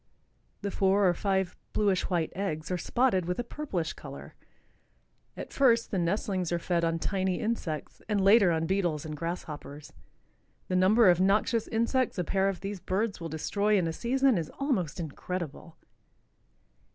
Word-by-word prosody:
The 200 - -2
four 195 +1 +3
or 175 - +4
five 190 0 -1 0.2
bluish 200 -3 +1
white 170 -4 0
eggs 165 -4 -3
are 180 - 0
spotted 240 -7 +1
with 180 - -1
a 245 - -1
purplish 230 - -3
color. - - -10 1.0
At - - -7
first 235 -4 +3
the 195 - 0
nestlings 185 0 -1
are 175 - +1
fed 170 0 -1
on 165 0 +1
tiny 190 +1 -1
insects 190 -9 -3
and 210 -1 +1
later 200 0 +6
on 165 0 0
beetles 175 -5 0
and 155 -1 -5
grasshoppers. 150 -3 -6 0.8
The 185 - 0
number 200 +5 +5
of 180 0 +5
noxious 210 +4 +2
insects 235 +2 0
a 180 - 0
pair 195 +3 +1
of 195 - -5
these 200 0 -4
birds 200 +2 -2
will 165 - -4
destroy 205 +7 +1
in 180 - +1
a 165 - -2
season 255 +1 +2
is 160 - -4
almost 230 - -1
incredible. 165 0 -6
190 Hz, 165 wpm, -29 LUFS, 170-210 Hz, 1.0 s, later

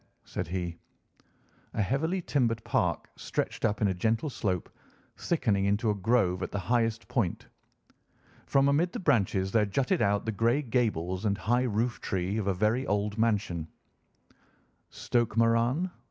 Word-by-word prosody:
said - - -4
he. 85 -1 -4 1.0
A - - +1
heavily 160 - -1
timbered 115 -7 0
park - - 0
stretched - - -3
up 105 -1 0
in - - +4
a - - +1
gentle 110 - 0
slope, 95 -8 -2 0.5
thickening 105 - 0
into 105 +2 +2
a - - +1
grove 100 -3 +1
at - - -2
the - - -3
highest 115 +2 0
point. 105 -9 -1 1.0
From 135 0 +3
amid 155 +5 +2
the - - -3
branches 100 - +1
there 110 0 +3
jutted 135 - 0
out 100 0 +2
the 110 - 0
grey 115 +7 +1
gables 105 - -1
and 100 -1 +1
high 120 +3 +1
roof 115 +1 -1
tree 95 +2 -1
of 100 - -2
a 100 - +2
very 110 +7 +1
old 105 +1 -1
mansion. 100 -8 0 1.2
"Stoke 120 -2 -1
Moran?" 115 +10 +2
110 Hz, 155 wpm, -29 LUFS, 100-125 Hz, 1.2 s, in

